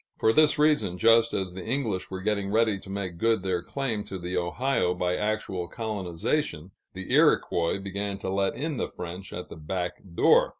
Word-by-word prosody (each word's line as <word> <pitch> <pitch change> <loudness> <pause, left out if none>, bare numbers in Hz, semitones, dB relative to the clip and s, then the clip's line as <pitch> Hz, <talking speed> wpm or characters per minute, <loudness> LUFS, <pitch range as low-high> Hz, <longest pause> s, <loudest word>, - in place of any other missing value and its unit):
For 110 - +3
this 155 +1 +5
reason, 145 - +2
just 115 +3 +5
as 95 -2 -2
the 95 0 -7
English 115 -6 -2
were 95 0 -5
getting 100 -1 0
ready 110 -2 +2
to 95 - -13
make 95 -3 -4
good 115 -3 +2
their 90 -2 0
claim 120 -5 -2
to 95 - -5
the 90 +1 -4
Ohio 90 +2 0
by 90 0 0
actual 105 -4 -2
colonization, 95 - -2 0.2
the 95 0 -5
Iroquois 85 +1 +3
began 100 +1 -4
to 95 - -4
let 95 0 +1
in 150 0 -3
the - - -1
French 90 +2 -7
at 90 - -6
the - - -8
back 90 +3 -3 0.2
door. - - +5
95 Hz, 185 wpm, -27 LUFS, 90-115 Hz, 0.2 s, this